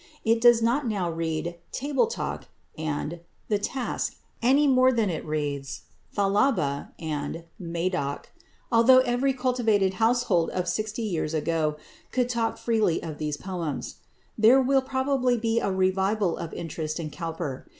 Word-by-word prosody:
It 225 +1 +3
does 240 -1 +6
not 245 +4 +1
now 190 -6 -1
read 165 +1 -3
"Table 285 - +1
Talk" 465 - -4 0.3
and 155 +2 -3 0.3
"The 210 -2 +2
Task" 250 +4 -3 0.3
any 275 +5 +4
more 255 -1 +5
than 225 -6 +1
it 160 - -4
reads 145 -3 -3 0.3
"Thalaba" 195 - +1
and 155 0 -4 0.2
"Madoc," 170 -4 -3 0.4
although 250 +3 +7
every 245 +2 +1
cultivated 240 -7 +1
household 225 -7 +3
of 180 -1 -2
sixty 215 +5 -2
years 165 -6 -2
ago 155 -1 0 0.4
could 250 -1 +1
talk 230 -2 -1
freely 220 -8 +1
of 155 -2 -6
these 150 -1 -2
poems. 170 -7 -4 0.4
There 230 +5 +7
will 270 +1 +3
probably 260 -1 +1
be 230 0 +1
a - - -1
revival 190 0 +1
of 165 - -6
interest 155 -1 -4
in 155 -2 -5
Cowper. 165 -5 -5
195 Hz, 140 wpm, -26 LUFS, 165-245 Hz, 0.4 s, although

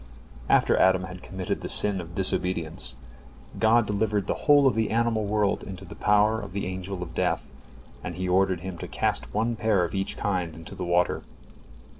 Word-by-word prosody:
After - - +4
Adam 95 0 +4
had 90 -1 -8
committed 95 -1 -4
the - - -5
sin 100 -3 +3
of 85 -1 -11
disobedience, 90 -8 -1 0.6
God 115 +1 +4
delivered 105 -1 0
the - - 0 0.2
whole 145 -1 +7
of 135 - +5
the 110 0 0
animal 115 -1 +1
world 105 -1 +1
into 95 -1 -8
the - - -10
power 105 +1 +3
of 100 -3 -9
the 100 - -2
Angel 95 0 -5
of 80 -2 -9
Death, - - 0 0.6
and 85 - -5
He 90 +1 -3
ordered 95 -1 +2
him 90 -2 -6
to - - -6
cast - - -1
one 115 +2 0
pair 110 -5 +2
of 85 - -3
each 95 0 -2
kind 90 -5 -2
into 80 0 -10
the 90 - -5
water. 85 0 +1
95 Hz, 190 wpm, -26 LUFS, 90-105 Hz, 0.6 s, whole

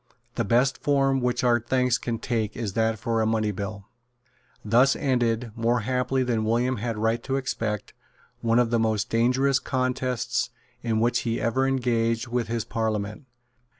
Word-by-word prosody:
The 115 - -1
best 125 +5 +2
form 135 -2 +2
which 125 0 0
our 120 -1 +4
thanks 125 +1 +1
can 120 -3 -3
take 110 -3 -2
is 110 -5 -3
that 115 0 +1
of 110 - -18
a 115 -2 +1
money 110 -1 +1
bill." 100 0 -6 0.8
Thus 125 +5 +4
ended, 120 -4 0
more 115 +1 +1
happily 130 +2 0
than 120 -3 0
William 120 +3 +1
had 115 +2 -3
a - - -6
right 115 +2 +1
to 135 +2 -2
expect, 115 -6 -3 0.5
one 115 0 +2
of 120 -1 +3
the 115 - +2
most 110 0 0
dangerous 130 +4 +3
contests 130 -2 -1 0.3
in 115 -2 0
which 120 +2 +2
he 115 -1 -2
ever 125 +4 +1
engaged 120 -2 0
with 120 -1 -1
his 115 0 -2
Parliament. 110 +2 -3
120 Hz, 170 wpm, -25 LUFS, 110-125 Hz, 0.8 s, our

